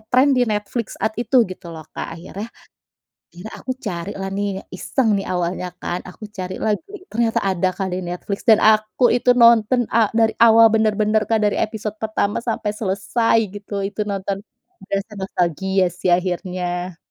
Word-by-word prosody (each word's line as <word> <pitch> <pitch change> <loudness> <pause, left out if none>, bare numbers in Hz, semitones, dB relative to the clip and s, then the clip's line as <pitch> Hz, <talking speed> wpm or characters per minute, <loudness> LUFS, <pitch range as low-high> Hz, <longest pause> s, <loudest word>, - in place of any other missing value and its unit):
trend 265 +4 +4
di 250 -3 +2
Netflix 210 +2 -3
saat 220 - -1
itu 245 0 +4
gitu 185 -2 -9
loh 160 -2 -8
Kak. 165 - -6
Akhirnya 195 +6 -7 0.9
iya 185 +5 -8
aku 255 0 -5
carilah 195 -2 -5
nih 200 -1 -3
iseng 225 +4 0
nih 195 - -4
awalnya 180 0 -2
kan, 175 - -2
aku 185 +4 -11
cari 185 -2 -5
lah 215 - 0 0.2
Glee, 390 -2 -10
ternyata 230 0 +1
ada 190 -1 +1
Kak 195 -1 -2
di 185 - -2
Netflix 180 +5 -5
dan 220 -1 +6
aku 215 +3 +4
itu 245 0 +3
nonton 235 +1 +5
a 225 -2 +4
dari 225 -1 +4
awal 225 -1 +7
bener-bener 215 0 +2
Kak 220 -1 +2
dari 205 - +1
episode 215 -1 -3
pertama 215 -1 -1
sampai 225 -3 -2
selesai 215 +2 0 0.2
gitu 200 -1 -5
itu 205 +2 -4
nonton, 195 0 -3 0.5
berasa 200 +2 -3
nostalgia 190 +1 0
sih 180 - -3
akhirnya. 180 0 -3
205 Hz, 165 wpm, -21 LUFS, 185-225 Hz, 0.9 s, awal